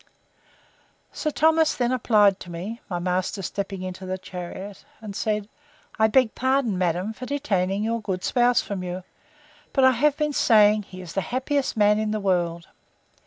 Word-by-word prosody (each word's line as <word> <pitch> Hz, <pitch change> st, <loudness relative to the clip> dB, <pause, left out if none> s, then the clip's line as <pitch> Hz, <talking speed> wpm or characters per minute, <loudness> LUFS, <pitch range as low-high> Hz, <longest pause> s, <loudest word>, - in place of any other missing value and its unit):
Sir 305 Hz, -, -2 dB
Thomas 320 Hz, +1 st, +3 dB
then 245 Hz, -1 st, 0 dB
applied 210 Hz, -6 st, +3 dB
to 180 Hz, -, -10 dB
me, 190 Hz, +8 st, -6 dB
my 180 Hz, -, -2 dB
master 180 Hz, +2 st, -2 dB
stepping 195 Hz, 0 st, -4 dB
into 185 Hz, +1 st, -6 dB
the 185 Hz, 0 st, -3 dB
chariot, 185 Hz, +1 st, -8 dB, 0.2 s
and 210 Hz, -3 st, -8 dB
said, 210 Hz, -1 st, -1 dB, 0.5 s
I 220 Hz, -, +5 dB
beg 230 Hz, +1 st, +3 dB
pardon, 260 Hz, -4 st, +1 dB
madam, 180 Hz, +3 st, -1 dB
for 255 Hz, +3 st, -8 dB
detaining 200 Hz, -9 st, -1 dB
your 230 Hz, +1 st, -1 dB
good 185 Hz, -3 st, -3 dB
spouse 245 Hz, +2 st, +3 dB
from 200 Hz, -2 st, -5 dB
you: 180 Hz, 0 st, -5 dB, 0.7 s
but 270 Hz, -, +3 dB
I 260 Hz, -, +7 dB
have 285 Hz, +4 st, +2 dB
been 300 Hz, -1 st, 0 dB
saying, 215 Hz, -4 st, +5 dB
he 185 Hz, 0 st, -10 dB
is 175 Hz, -3 st, -9 dB
the 195 Hz, -, 0 dB
happiest 260 Hz, -, -1 dB
man 210 Hz, 0 st, +4 dB
in 215 Hz, 0 st, -1 dB
the 215 Hz, 0 st, -1 dB
world. 175 Hz, -3 st, 0 dB
210 Hz, 170 wpm, -24 LUFS, 185-245 Hz, 0.7 s, I